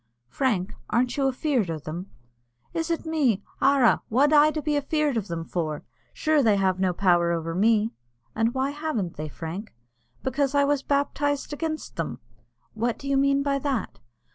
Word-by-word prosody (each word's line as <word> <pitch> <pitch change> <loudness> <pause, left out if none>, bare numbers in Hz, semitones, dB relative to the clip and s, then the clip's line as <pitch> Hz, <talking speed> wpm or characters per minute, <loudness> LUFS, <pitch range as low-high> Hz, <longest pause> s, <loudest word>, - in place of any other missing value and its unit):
"Frank, 205 - 0 0.2
arn't 245 +2 +1
you 275 -1 +2
afeard 260 - 0
o' 165 - -2
them?" 165 +6 -7 0.6
"Is 325 0 -2
it 335 0 -1
me! 275 -11 +1 0.2
Arra, 270 -3 +4
what 280 +6 +3
ud' 305 +1 +5
I - - -1
be 300 0 0
afeard 290 -1 0
o' 225 - +1
them 170 -4 -5
for? 155 -4 -3 0.3
Sure 310 -1 +2
they 220 -5 +4
have 190 -1 +1
no 185 -1 +2
power 175 -2 +3
over 165 -1 -2
me." 215 +4 +3 0.4
"And 225 +3 0
why 265 +1 0
haven't 290 - -3
they, 155 +1 -5
Frank?" 170 - -7 0.5
"Because 275 +1 0
I 285 - +5
was 285 -1 +1
baptized 285 +1 0
against 310 +1 -4
them." 165 -7 -3 0.6
"What 230 +1 -1
do 275 - -8
you 275 - +1
mean 275 0 +3
by 280 -1 0
that?" 270 -7 -2
255 Hz, 175 wpm, -25 LUFS, 190-285 Hz, 0.6 s, ud